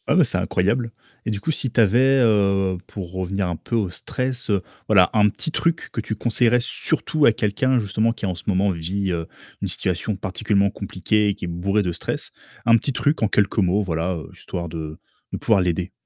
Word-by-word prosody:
Ah - - +2
bah, - - +6
c'est - - +1
incroyable. 115 +6 0 0.4
Et - - 0
du 100 -1 -3
coup 160 - -2
si 135 -5 -2
tu 115 - +2
avais, 130 +6 +4
heu, 100 -4 +2
pour 95 -3 -7
revenir 95 0 -2
un 85 - -2
peu 115 - -3
au 100 -5 0
stress, 125 +5 -4
heu, 100 -3 +2 0.3
voilà 95 -5 +5
un 105 -1 +4
petit 160 - -3
truc 165 +1 -1
que - - -2
tu 110 - -4
conseillerais 120 +2 +2
surtout 155 +1 +1
à 115 - +7
quelqu'un 120 +5 +1
justement 110 +2 0
qui 110 - -8
en 90 -2 -1
ce 85 - -8
moment 100 0 +2
vit, 95 +3 -2
heu, 85 -1 -3 0.3
une - - -2
situation 95 +3 -1
particulièrement 100 +1 0
compliquée 105 +2 0
et 100 - +1
qui 100 - -8
est - - -5
bourré 95 +5 0
de 90 -2 -1
stress. - - -4 0.3
Un 115 0 +7
petit 140 +5 -2
truc 145 +2 0
en 110 - +3
quelques 105 +1 +1
mots, 100 +1 +3
voilà, 85 0 -1
heu, 80 - -8
histoire 85 -1 -6
de 80 -1 -6 0.3
de - - -2
pouvoir 105 -4 +3
l'aider. 90 0 -1
100 Hz, 215 wpm, -22 LUFS, 90-115 Hz, 0.4 s, à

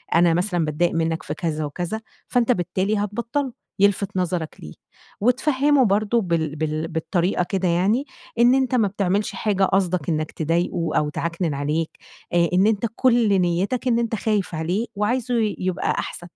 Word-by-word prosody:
أنا 170 0 +5
مثلًا 175 -1 0
باتضايق 155 +3 0
منّك 165 0 -1
في 150 - -4
كذا، 155 -1 -2
وكذا. 175 +9 -4 0.3
فأنتَ 245 0 +2
بالتالي 185 +2 0
هتبطّله، 235 +6 -2 0.3
يِلفت 200 -1 +2
نَظرك 175 -3 -2
ليه، 75 - -9 0.5
وتفهّمه 265 +3 +3
برضو 215 +3 +2
بال 165 -4 -1
بال 155 +1 -2
بالطريقة 175 +2 0
كده 190 -2 0
يعني، 195 +10 +2 0.3
إن 240 +2 +6
أنتَ 265 -1 +1
ما 225 -5 +3
بتعملش 200 +1 0
حاجة 200 -3 0
قصدك 185 -5 +1
إنك 155 -1 -1
تضايقه 170 +1 -1
أو 150 0 +1
تعَكنن 170 0 -2
عليه، 150 +3 -1 0.5
آآ 170 -1 +3
إن 190 +3 +4
أنتَ 220 +1 +1
كل 235 -6 +3
نيّتك 195 +9 0
إن 235 -1 +3
أنتَ 230 -1 -1
خايف 205 -4 -1
عليه 175 +8 -1
وعايزه 245 +4 0
ي 220 -3 +1
يبقى 185 -1 -1
أحسن. 175 - -4
185 Hz, 160 wpm, -23 LUFS, 165-220 Hz, 0.5 s, إن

